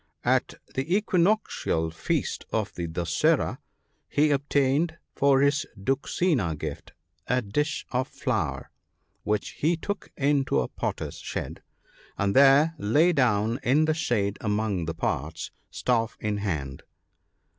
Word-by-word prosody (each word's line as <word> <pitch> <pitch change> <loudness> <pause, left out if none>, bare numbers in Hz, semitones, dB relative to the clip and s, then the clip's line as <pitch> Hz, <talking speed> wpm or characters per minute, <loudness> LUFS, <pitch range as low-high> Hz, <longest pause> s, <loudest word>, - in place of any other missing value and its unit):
At 130 +1 +2 0.2
the 140 +8 0
equinoctial 180 - +1
feast 80 - -2
of 110 -2 -1
the 85 -1 -4
Dussera, 80 0 +1 0.5
he 150 +1 +3
obtained 145 +3 +1 0.2
for 135 -1 +4
his 140 +1 +2
duxina 130 - 0
gift 75 -1 -6 0.3
a 125 +1 +1
dish 145 +9 -1
of 130 +1 0
flour, 110 - -2 0.5
which 105 0 -1
he 165 +3 0
took 205 +5 -5
into 140 -1 +2
a - - -1
potter's - - -4
shed; - - -5 0.6
and 100 0 0
there 140 +4 +6
lay 150 +13 +3
down 115 -4 +2
in 140 +5 +3
the 155 - +2
shade 105 -10 -1
among 105 -4 0
the 80 0 -4
pots, - - -3 0.2
staff 115 -3 0
in 105 -1 -1
hand. 75 -10 -3
125 Hz, 125 wpm, -26 LUFS, 100-145 Hz, 0.6 s, there